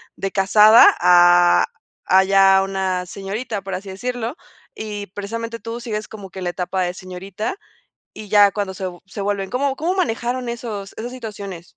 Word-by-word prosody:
de 195 - -4
casada 210 +3 +6
a, 175 0 +5 0.4
a 190 +1 +5
ya 195 0 +5
una 190 -2 -2
señorita, 200 +3 -5
por 195 0 -7
así 195 +2 -6
decirlo, 245 +5 -4 0.4
y 210 -2 -6
precisamente 230 +4 -6
tú 230 +1 -6
sigues 215 -3 -4
como 205 -3 -10
que 190 +1 -9
la 175 - -1
etapa 180 +1 -2
de 180 0 -2
señorita 190 - -6 0.6
y 215 - -10
ya 205 0 +6
cuando 195 -1 -4
se 190 - -6 0.2
se 200 +2 -7
vuelven 195 -1 -2
¿Cómo 270 +2 -1
cómo 335 +6 -2
manejaron 245 -6 -2
esos 215 -4 -6
esas 240 +3 -6
situaciones? 200 -7 -8
200 Hz, 165 wpm, -20 LUFS, 190-230 Hz, 0.6 s, casada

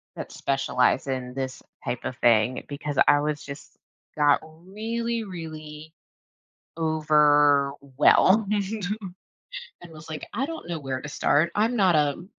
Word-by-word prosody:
that - - -7
specialize 135 -1 0
in 130 -1 -4
this 130 0 -5 0.2
type 120 - -4
of 130 - -4
thing, 120 +1 +2
because 145 0 -5
I 145 - +5
was 150 0 -2
just 140 +1 -10 0.4
got 145 -2 +4
really 220 +8 -4
really, 155 -4 -9 0.9
overwhelmed, 150 +4 +3 1.3
and 175 -1 -12
was 155 0 -12
like, 155 -1 -6
"I 255 +6 -1
don't 325 - -7
know 170 -2 -4
where 135 -2 -4
to 150 - -7
start, 155 +3 +1
I'm 225 +4 +1
not 190 -6 +3
a 150 +3 0
150 Hz, 130 wpm, -25 LUFS, 140-175 Hz, 1.3 s, I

